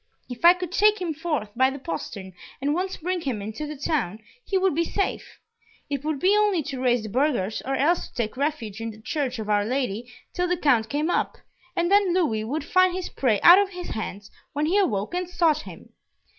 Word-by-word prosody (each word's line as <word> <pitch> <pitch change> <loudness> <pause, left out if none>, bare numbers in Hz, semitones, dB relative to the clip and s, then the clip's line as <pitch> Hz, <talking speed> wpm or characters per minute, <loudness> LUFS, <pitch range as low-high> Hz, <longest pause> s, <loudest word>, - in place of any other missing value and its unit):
If 245 +2 -9
I 345 +1 +8
could 360 -2 -5
take 425 +3 +4
him 345 -3 -2
forth 300 -9 -3
by 260 +2 +4
the 270 - -6
postern, 190 - -6 0.3
and 285 +2 0
once 370 +3 -2
bring 360 +2 -2
him 260 -8 -2
into 220 +9 -5
the 305 - -6
town, 270 - -1 0.3
he 390 - 0
would 380 -2 +2
be 335 +3 +1
safe. 395 +4 -3 0.5
It 280 -1 -2
would 310 -1 -1
be 380 +6 +4
only 415 -6 +2
to 265 -1 -5
raise 245 -3 +2
the 215 - -6
burghers, 240 -4 0
or 270 +1 -1
else 330 +6 +1
to - - -24
take 225 -2 -2
refuge 255 -7 -3
in 225 - -3
the 215 -1 -11
Church 255 +1 -2
of 220 -2 -5
Our 205 -1 +2
Lady 245 -1 -2 0.2
till 360 0 0
the 360 0 0
Count 245 -9 +2
came 300 +6 0
up, - - -1 0.4
and 345 0 0
then 400 -3 +4
Louis 230 -13 +1
would 280 +7 -3
find 370 +3 +3
his 370 -1 -4
prey 225 -7 +1
out 355 +3 +10
of 405 -1 +1
his 360 -2 -7
hands 205 -2 -6 0.2
when 295 +2 0
he 370 +6 +3
awoke 210 - 0
and 360 0 -2
sought 325 -4 +2
him." - - -12
290 Hz, 225 wpm, -25 LUFS, 225-355 Hz, 0.5 s, out